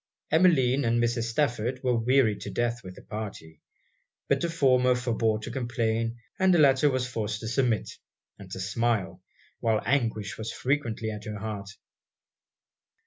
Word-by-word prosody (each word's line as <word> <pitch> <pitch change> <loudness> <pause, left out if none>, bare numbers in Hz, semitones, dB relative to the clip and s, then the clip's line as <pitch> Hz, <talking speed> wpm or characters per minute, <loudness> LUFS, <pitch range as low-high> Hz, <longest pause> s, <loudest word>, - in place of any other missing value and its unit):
Emmeline 145 -6 +4
and 120 0 +2
Mrs. 120 0 +1
Stafford 125 -1 -1
were 125 -1 +2
wearied 115 -2 +2
to - - -5
death 120 0 -1
with 90 -1 -9
the - - -14
party. 100 -8 -7 0.7
But - - +2
the 170 - 0
former 130 -5 +3
forbore 115 -3 0
to 120 - -5
complain, 115 -2 -1 0.2
and 190 0 +4
the 175 - +5
latter 145 -1 +5
was 130 -2 -1
forced 110 -4 -3
to 110 - -5
submit, 120 -1 0 0.4
and 100 -2 -11
to 95 - -6
smile, 115 +1 -1 0.4
while 110 -2 +1
anguish 115 -6 0
was 110 +1 -4
frequently 120 -5 -1
at 105 0 -8
her 105 -1 -5
heart. 100 -1 -5
120 Hz, 155 wpm, -27 LUFS, 110-130 Hz, 0.7 s, the